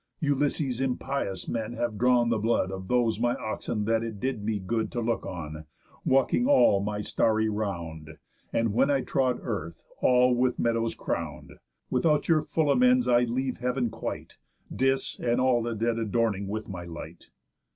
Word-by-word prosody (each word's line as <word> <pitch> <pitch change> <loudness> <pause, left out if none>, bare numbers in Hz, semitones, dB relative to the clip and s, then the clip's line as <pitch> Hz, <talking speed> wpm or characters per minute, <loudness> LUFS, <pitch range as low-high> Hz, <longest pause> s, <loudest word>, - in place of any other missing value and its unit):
Ulysses' 140 -3 0
impious 130 -5 -2
men 115 0 -3
have 120 -3 -3
drawn 120 -1 +4
the 115 -2 +1
blood 110 -3 +1
Of 95 -1 -6
those 120 -2 +1
my 120 +1 +1
oxen 110 -1 -3
that 115 +1 +2
it 110 -3 -5
did 125 -2 -2
me 110 0 0
good 110 +4 -2
To 120 - -1
look 115 -2 -1
on, 80 -4 -6 0.4
walking 135 - +2
all 275 - +5
my 105 +1 -2
starry 110 +1 +1
round, 85 -7 -4 0.3
And 115 -2 0
when 135 +5 +3
I 140 -2 +2
trod 130 -1 0
earth 85 -8 -5 0.2
all 125 0 +4
with 125 +1 +1
meadows 115 -1 0
crown'd. - - -4 0.4
Without 145 +3 +2
your 160 -2 +4
full 150 -1 0
amends 250 - +4
I'll 120 0 +4
leave 130 +2 -2
heav'n 125 -1 -1
quite, 115 - -6 0.4
Dis 135 +1 0
and 120 0 +1
the 120 -3 +1
dead 115 +1 0
adorning 110 -2 0
with 110 +2 -4
my 90 -3 -6
light. 85 -1 -10
115 Hz, 165 wpm, -27 LUFS, 105-130 Hz, 0.4 s, all